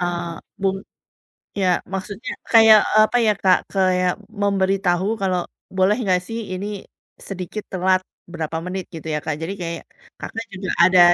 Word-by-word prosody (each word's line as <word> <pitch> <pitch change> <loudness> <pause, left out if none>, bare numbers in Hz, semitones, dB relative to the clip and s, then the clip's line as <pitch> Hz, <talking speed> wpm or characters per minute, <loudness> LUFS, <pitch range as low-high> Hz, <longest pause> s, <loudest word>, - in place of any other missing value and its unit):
Eee, 175 -1 -2 0.3
bung 195 0 +1 0.8
ya, 185 - +2 0.3
maksudnya 195 +3 -5 0.2
kayak, 225 -1 +9
eee, 215 - +7
apa 245 - 0
ya, 215 - +5
Kak, 185 -1 +5
kayak 185 -2 +2 0.3
memberitahu 195 -2 +1
kalau, 185 -2 +1 0.4
boleh 190 +3 +4
nggak 185 -3 +2
sih 225 0 -4
ini, 185 +2 -4 0.5
sedikit 195 +2 -6
telat 185 0 +2 0.3
berapa 160 -1 -3
menit 185 0 -4
gitu 160 -1 -8
ya 150 - 0
Kak, 155 - -1
jadi 165 +4 -3
kayak, 170 -1 -4 0.4
Kakak 225 +1 -5
juga 190 0 -5
ada 180 0 +6
185 Hz, 150 wpm, -21 LUFS, 180-195 Hz, 0.8 s, kayak